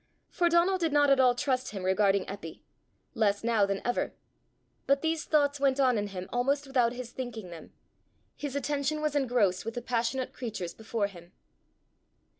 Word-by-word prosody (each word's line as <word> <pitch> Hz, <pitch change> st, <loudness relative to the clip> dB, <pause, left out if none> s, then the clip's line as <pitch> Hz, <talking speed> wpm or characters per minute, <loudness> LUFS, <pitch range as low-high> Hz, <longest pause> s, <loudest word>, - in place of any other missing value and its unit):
For 345 Hz, -1 st, +2 dB
Donal 345 Hz, +3 st, +3 dB
did 330 Hz, -3 st, 0 dB
not 290 Hz, -1 st, +4 dB
at 275 Hz, -, +5 dB
all 250 Hz, -2 st, +5 dB
trust 260 Hz, -1 st, -1 dB
him 195 Hz, -3 st, -6 dB
regarding 195 Hz, +1 st, +2 dB
Eppy 190 Hz, -5 st, -8 dB, 0.5 s
less 210 Hz, -4 st, +1 dB
now 225 Hz, -3 st, +3 dB
than 195 Hz, 0 st, -3 dB
ever. 245 Hz, -, -1 dB, 0.7 s
But 275 Hz, +2 st, +2 dB
these 320 Hz, -1 st, 0 dB
thoughts 290 Hz, -2 st, +2 dB
went 275 Hz, -1 st, +2 dB
on 255 Hz, -3 st, +4 dB
in 205 Hz, -1 st, -1 dB
him 185 Hz, -2 st, -6 dB
almost 275 Hz, +4 st, +1 dB
without 250 Hz, -3 st, +2 dB
his 245 Hz, -1 st, -7 dB
thinking 230 Hz, -8 st, -6 dB
them; 165 Hz, -2 st, -11 dB, 0.6 s
his 285 Hz, -2 st, -5 dB
attention 285 Hz, +2 st, -1 dB
was 300 Hz, -1 st, 0 dB
engrossed 240 Hz, -9 st, +2 dB
with 225 Hz, +1 st, -5 dB
the 245 Hz, -, -3 dB
passionate 245 Hz, +2 st, -1 dB
creatures 215 Hz, -8 st, -5 dB
before 220 Hz, -1 st, -2 dB
him. 175 Hz, -3 st, -10 dB
245 Hz, 175 wpm, -29 LUFS, 205-280 Hz, 0.7 s, at